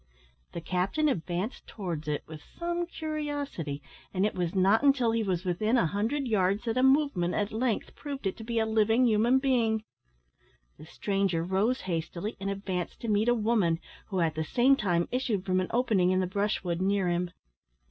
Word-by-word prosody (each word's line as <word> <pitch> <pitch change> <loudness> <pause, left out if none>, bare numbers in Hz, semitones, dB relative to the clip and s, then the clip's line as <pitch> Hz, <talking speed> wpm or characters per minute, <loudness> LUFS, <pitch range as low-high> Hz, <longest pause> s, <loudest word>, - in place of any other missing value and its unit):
The 170 - -5
captain 185 - 0
advanced 185 - -2
towards 170 -7 -5
it 150 -1 -1
with 155 -1 -10 0.2
some 345 0 -2
curiosity, 290 - -4 0.3
and 190 +1 +1
it 210 - 0
was 175 0 -2
not 195 +4 +4
until 275 -5 +3
he 230 0 +1
was 185 -3 -1
within 215 +7 +1
a 170 - +3
hundred 225 - -1
yards 200 -2 +1
that 230 -1 -1
a 255 - +2
movement 265 - +3
at 205 -1 -1
length 225 0 -1
proved 280 -5 -6
it 190 - 0
to 225 - -8
be 230 +1 -3
a 220 - +3
living 225 +3 +3
human 230 +3 +4
being. 235 -5 +1 1.0
The 155 - -11
stranger 195 -3 0
rose 195 +8 +1
hastily, 175 +3 -3
and 195 0 -3
advanced 190 -3 -3
to 230 - -3
meet 210 +2 +3
a 240 - +4
woman, 210 -7 +2 0.3
who 190 -3 -1
at 160 -2 +1
the 160 +1 -2
same 250 - +4
moment 175 -3 +1
issued 235 -7 -1
from 185 -1 +2
an 185 - -1
opening 220 -7 +2
in 185 0 +2
the 185 - +1
brushwood 185 -2 -1
near 195 -1 +1
him. 175 0 0
205 Hz, 190 wpm, -29 LUFS, 180-240 Hz, 1.0 s, not